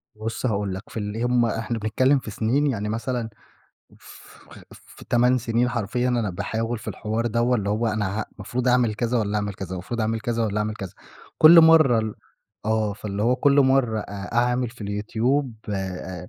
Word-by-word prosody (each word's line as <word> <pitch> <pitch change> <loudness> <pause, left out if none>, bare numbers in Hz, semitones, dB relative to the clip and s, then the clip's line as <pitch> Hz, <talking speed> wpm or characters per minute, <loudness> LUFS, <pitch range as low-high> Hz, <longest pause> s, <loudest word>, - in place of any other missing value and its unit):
بُصّ 110 +4 -4
هاقول 100 -4 -1
لك، 95 - -10
في - - -9
اللي 105 +2 -3
هم 120 -1 +2
إحنا 115 0 -2
بنتكلم 130 +6 +2
في 110 - -8
سنين، 125 +6 +1
يعني 105 -6 -2
مثلًا 115 +1 -3 0.7
ف - - -15 0.3
في - - -15
8 125 +1 +3
سنين 120 +1 0
حرفيًا 120 +1 -1
أنا 115 -5 0
باحاول 110 +5 -3
في - - -9
الحوار 110 +2 -3
دوّة، 120 +2 +1
اللي 100 -2 -3
هو 110 +3 0
أنا 105 -1 -1
ه - - -3
مفروض 120 +5 -2
أعمل 125 -3 +3
كذا 120 +2 0
والّا 105 -1 -1
أعمل 105 -1 -2
كذا، 95 -2 -7
المفروض 95 +6 -4
أعمل 110 +1 -1
كذا 115 0 -1
والّا 105 -1 -1
أعمل 105 0 -1
كذا، 95 -4 -7 0.5
كُلّ 165 +2 +9
مَرّة 160 -7 +6
ال 110 -1 -2 0.5
آه، 110 -1 0
فاللي 100 0 -5
هو 125 +3 +2
كُلّ 140 +2 +4
مَرّة 130 -4 +2
أ 100 0 -7
أعمل 125 0 +1
في 120 -1 -18
اليوتيوب 115 +6 -1 0.2
آآ، 95 -2 -5
115 Hz, 190 wpm, -24 LUFS, 105-125 Hz, 0.7 s, كُلّ